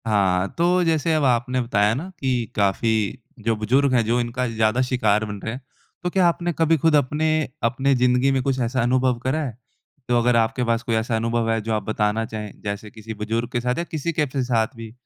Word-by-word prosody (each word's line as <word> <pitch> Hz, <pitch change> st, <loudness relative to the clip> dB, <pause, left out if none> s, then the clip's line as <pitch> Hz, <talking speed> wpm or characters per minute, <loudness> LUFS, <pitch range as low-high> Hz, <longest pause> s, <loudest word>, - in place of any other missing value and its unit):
हाँ, 95 Hz, -3 st, +2 dB
तो 180 Hz, +2 st, +3 dB
जैसे 165 Hz, -1 st, +1 dB
अब 155 Hz, -2 st, +1 dB
आपने 125 Hz, 0 st, +1 dB
बताया 105 Hz, -3 st, +2 dB
ना 165 Hz, +9 st, -5 dB
कि 125 Hz, -3 st, -1 dB
काफ़ी 100 Hz, +2 st, +1 dB, 0.5 s
जो 115 Hz, -1 st, +2 dB
बुजुर्ग 130 Hz, +6 st, +2 dB
हैं 120 Hz, -2 st, +4 dB
जो 120 Hz, +2 st, +1 dB
इनका 120 Hz, +1 st, -2 dB
ज़्यादा 110 Hz, +1 st, +1 dB
शिकार 125 Hz, -5 st, +1 dB
बन 105 Hz, -1 st, -6 dB
रहे 110 Hz, -, -3 dB
हैं, 130 Hz, -, -7 dB, 0.4 s
तो 180 Hz, -, 0 dB
क्या 180 Hz, -1 st, +3 dB
आपने 175 Hz, 0 st, 0 dB
कभी 165 Hz, 0 st, +4 dB
ख़ुद 160 Hz, +1 st, +3 dB
अपने 150 Hz, +2 st, +1 dB, 0.4 s
अपने 135 Hz, +4 st, +2 dB
ज़िंदगी 125 Hz, +2 st, +3 dB
में 135 Hz, -1 st, +1 dB
कुछ 135 Hz, -1 st, 0 dB
ऐसा 125 Hz, +1 st, 0 dB
अनुभव 125 Hz, 0 st, +1 dB
करा 135 Hz, +5 st, 0 dB
है? 120 Hz, -6 st, -6 dB, 0.5 s
तो 120 Hz, -, +2 dB
अगर 120 Hz, 0 st, +2 dB
आपके 115 Hz, +2 st, +1 dB
पास 115 Hz, 0 st, 0 dB
कोई 115 Hz, -, -1 dB
ऐसा 110 Hz, +1 st, 0 dB
अनुभव 115 Hz, 0 st, 0 dB
है 115 Hz, -, +1 dB
जो 110 Hz, +1 st, -2 dB
आप 105 Hz, -2 st, -1 dB
बताना 110 Hz, +1 st, 0 dB
चाहें, 105 Hz, -2 st, -6 dB
जैसे 100 Hz, +1 st, -5 dB
किसी 110 Hz, 0 st, -8 dB
बुजुर्ग 110 Hz, +3 st, -3 dB
के 120 Hz, -, -1 dB
साथ 125 Hz, +1 st, -1 dB
या 170 Hz, -, -1 dB
किसी 160 Hz, +1 st, -2 dB
के 150 Hz, -1 st, +1 dB
फ 140 Hz, 0 st, -7 dB
साथ 115 Hz, 0 st, 0 dB
भी, 115 Hz, -1 st, -9 dB
120 Hz, 225 wpm, -22 LUFS, 110-135 Hz, 0.5 s, हैं